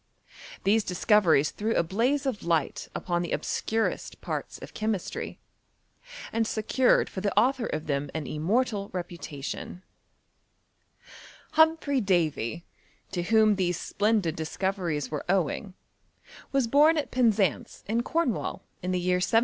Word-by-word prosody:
These 215 +2 +3
discoveries 180 -6 +3
threw 220 +2 -2
a - - +3
blaze 245 - 0
of 255 -6 -2
light 165 -4 0
upon 175 -1 -1
the 175 - -4
obscurest 225 0 -2
parts - - -4
of - - -11
chemistry, 215 -4 -3 1.0
and 225 -1 +1
secured 225 +4 +2
for 190 - -6
the 200 0 -2
author 255 -1 +2
of 155 0 -3
them 140 -1 -1
an 160 -2 -2
immortal 200 - 0
reputation 175 -1 -6 1.7
Humphry 315 -4 +3
Davy, 170 - 0 0.5
to 180 - -1
whom 215 +2 +4
these 180 -2 0
splendid 205 -6 0
disco 160 +4 -1
veries 170 -8 -3
were 150 - -3
owing, 190 +1 0 0.8
was 275 -2 +2
bom 295 +7 +5
at 300 - -2
Penzance, 215 - +1
in 225 +3 +1
Corn 315 -1 +1
wall, 150 -5 -5 0.2
in 180 - -3
the 180 - +1
year 180 0 +1
1778. 185 +5 +3
195 Hz, 135 wpm, -27 LUFS, 170-225 Hz, 1.7 s, bom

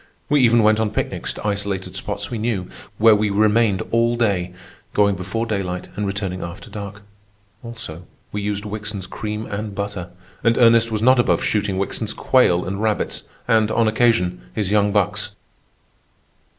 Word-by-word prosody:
We 145 -1 +4
even 120 -2 +5
went 110 +1 +4
on 110 -1 +1
picnics 105 - -3
to - - -9
isolated 100 -2 -2
spots 100 +2 -4
we 115 - -3
knew, 105 -5 -1 0.3
where 110 0 +7
we 105 0 +2
remained 105 -1 +3
all 115 +1 +2
day, 100 -7 0 0.4
going 100 -1 +4
before 95 +6 -3
daylight 95 -5 -3
and 105 -1 -2
returning 100 -2 -3
after 85 +5 -8
dark. 100 0 -7 0.6
Also, 115 -8 -9 0.2
we 105 - -3
used 105 0 -2
Wickson's 105 -2 -5
cream 105 +3 -5
and 105 0 -5
butter, 100 -3 -4 0.3
and 115 0 +3
Ernest 115 -1 +5
was 110 0 -1
not 130 +1 +5
above 120 - +2
shooting 100 -3 0
Wickson's 105 +3 -2
quail 90 -9 +3
and 95 +2 -3
rabbits, 110 -1 -1 0.3
and, 110 -1 +3
on 115 0 +2
occasion, 110 - +2
his 100 -2 -1
young 105 -1 +3
bucks. 105 +1 0
105 Hz, 165 wpm, -21 LUFS, 100-110 Hz, 0.6 s, where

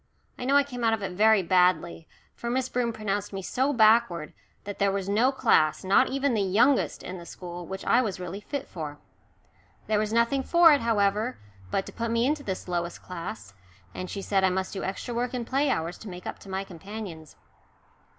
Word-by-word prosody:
I 250 - -4
know 275 +2 +3
I 285 - +5
came 250 -4 -7
out 225 -1 +3
of 215 -2 -2
it 190 - -3
very 215 +1 +4
badly, 180 -2 +2 0.3
for 235 - -5
Miss 260 +1 0
Broom 240 -1 0
pronounced 205 -3 -3
me 195 -1 -5
so 265 +8 0
backward 220 - +3 0.3
that 205 -1 -7
there 200 0 +3
was 195 -1 -2
no 225 +6 +3
class, 220 - +2
not 200 +8 +4
even 275 0 0
the 215 - +1
youngest, 230 +8 +2
in 185 0 -6
the 170 - -10
school, 175 -1 -8
which 190 0 -6
I 245 - +4
was 205 -7 -3
really 180 +3 -6
fit 280 +5 -5
for. 150 -4 -6 0.9
There 215 -1 +1
was 215 0 -1
nothing 235 +4 +2
for 335 +3 +6
it, 285 - +2
however, 215 +1 +1 0.3
but 195 - -1
to - - -10
put 230 0 -3
me 230 +1 +2
into 295 +2 0
this 190 -9 -5
lowest 175 -1 -3
class, 165 - -7 0.4
and 185 0 -6
she 200 - -5
said 195 -1 +1
I 190 - +5
must 190 +1 -2
do 195 - -4
extra 195 +5 -4
work 245 +2 -2
in 240 -2 -3
play 275 +4 +1
hours 165 -6 -2
to 220 - -9
make 180 0 -9
up - - -6
to 195 - -13
my 190 +1 -2
companions. 195 -3 -9
205 Hz, 215 wpm, -27 LUFS, 185-240 Hz, 0.9 s, for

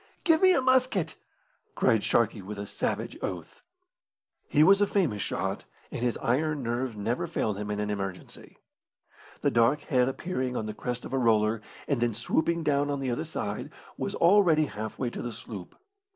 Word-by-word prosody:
"Give 325 -2 +4
me 375 -1 +7
a - - +2
musket!" 255 -8 +2 0.6
cried 110 -2 +3
Sharkey, 115 -2 +1
with 100 +2 -7
a 100 - -4
savage - - -3
oath. - - -5 0.9
He 150 - +4
was 195 +4 +6
a 205 - +4
famous 155 - 0
shot, - - -3 0.3
and - - -5
his 120 -1 0
iron 145 +3 +1
nerves 120 0 -2
never 120 +11 -1
failed 110 - -1
him 105 0 -4
in 105 0 -2
an 105 0 -1
emergency. 95 -2 -6 0.8
The - - +2
dark 120 +6 +3
head 125 -4 +2
appearing 130 -4 -3
on 110 - -2
the 110 - -4
crest 125 +3 -4
of - - -7
a 135 - +2
roller, 110 -2 +2 0.3
and 140 -5 0
then 120 -3 +1
swooping 165 +8 0
down 145 -1 +1
on 140 -1 -1
the 130 -2 -1
other 135 +6 -2
side, 105 -10 -4 0.3
was - - -3
already 170 -4 +5
half 110 -4 -6
way 125 -3 -2
to - - -6
the 120 - -4
sloop. 110 -4 -9
125 Hz, 185 wpm, -28 LUFS, 110-155 Hz, 0.9 s, me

